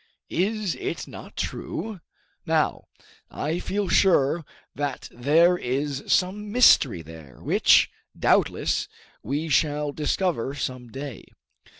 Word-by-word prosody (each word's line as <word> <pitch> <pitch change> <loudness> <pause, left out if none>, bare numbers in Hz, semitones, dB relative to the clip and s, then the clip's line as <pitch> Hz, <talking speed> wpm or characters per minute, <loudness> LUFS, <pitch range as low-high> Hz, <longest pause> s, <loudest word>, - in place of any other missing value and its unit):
Is 205 +1 0
it - - -5
not - - -11
true? 215 -5 -4 0.4
Now, - - 0 0.4
I 160 +4 -3
feel 200 +2 -2
sure 170 -5 +3 0.3
that 145 -2 -4
there 165 +8 +3
is 135 +2 -2
some 205 +3 +1
mystery 140 - +5
there, 80 -5 -13
which, - - +4 0.3
doubtless, - - +1 0.3
we 145 +7 -2
shall 150 0 +1
discover 150 -3 -1
some 130 -2 -4
day. 135 +2 -8
150 Hz, 105 wpm, -25 LUFS, 135-180 Hz, 0.4 s, mystery